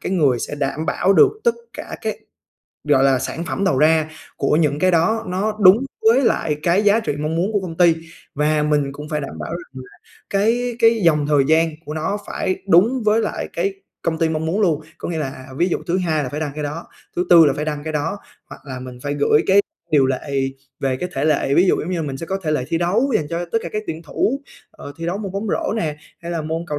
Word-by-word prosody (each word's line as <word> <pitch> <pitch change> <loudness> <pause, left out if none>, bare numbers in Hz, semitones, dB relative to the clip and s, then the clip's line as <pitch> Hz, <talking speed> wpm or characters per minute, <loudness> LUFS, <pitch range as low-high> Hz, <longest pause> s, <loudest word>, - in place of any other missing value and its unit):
cái - - -3
người 145 -9 +3
sẽ 130 - -4
đảm 145 +2 -2
bảo 190 +4 +2
được 395 - +6
tất 470 - +3 0.2
cả - - -7
các - - -2 0.7
gọi 135 -2 +4
là, 135 -1 +4
sản 165 +6 -4
phẩm 195 - -2
đầu 180 -9 +2
ra 155 +1 +3 0.3
của - - +1
những 150 -3 +1
cái 185 +3 +3
đó 200 +7 +2
nó 200 +4 -1
đúng 185 0 +8 0.3
với 235 +4 +6
lại 155 - +1
cái 180 +4 +3
giá 205 +2 +4
trị 220 - -2
mong 155 +2 -2
muốn 185 +6 0
của 205 - +1
công 175 -4 -6
ty 170 -2 +5 0.4
và 150 +1 +1
mình 145 -2 +1
cũng 150 +2 -9
phải 150 -1 -2
đảm 140 - -7
bảo - - -5
rằng 160 -6 -7
là 125 - -19 0.3
cái 230 +4 +1
cái 230 -1 +5
dòng 150 -3 +3
thời 145 -2 +3
gian 160 +1 +4
của 150 - -6
nó 175 +6 -2
phải 185 -1 -2
đúng 220 +9 +4
với 215 +1 +3
lại - - -3
cái 395 - -1 0.3
công 160 -1 -1
ty 165 - +2
mong 160 0 -2
muốn 180 +6 0
luôn. 165 -7 +2 0.2
Có - - -5
nghĩa 170 -2 -2
là 130 -3 -5
ví 175 - +3
dụ - - 0
thứ 175 +2 +1
Hai 160 -4 0
là - - -3
phải 150 - -4
đăng 155 -2 -2
cái 150 - -4
đó, 150 +4 -5 0.3
thứ 180 - 0
Tư 170 -2 +9
là 140 - +3
phải 150 - -3
đăng 150 -1 -4
cái 160 - -3
đó, 160 +6 -2 0.3
hoặc - - -10
là 130 -2 -6
mình 125 -1 -9
phải 145 0 -2
gửi 145 +1 +3
cái 200 +1 +5 0.3
điều 145 -4 +4
lệ 135 +2 -3 0.5
về 135 -1 0
cái 180 +7 -4
thể 135 - -2
lệ, 150 -3 +2
ví 180 - +5
dụ - - +4
giống 170 - -4
như 185 - -1
là 165 - -2
mình 135 -2 -4
sẽ 165 - -6
có 195 +2 -2
thể 155 - 0
lệ 130 -5 0
thi 165 0 0
đấu 210 +11 +1
dành 150 - -3
cho 170 +2 -2
tất 225 - +3
cả - - -4
các 215 - -2
tuyển 160 0 -5
thủ, 260 - -1 0.3
ờ, 145 - -10
thi 165 0 -5
đấu 180 +4 -2
môn 200 -3 -5
bóng 200 +3 -3
rổ - - -1
nè, 155 -8 -2 0.3
hay 170 - -5
là 165 -2 -2
môn 160 +2 -3
cầu 150 -3 -3
165 Hz, 260 wpm, -20 LUFS, 150-190 Hz, 0.7 s, Tư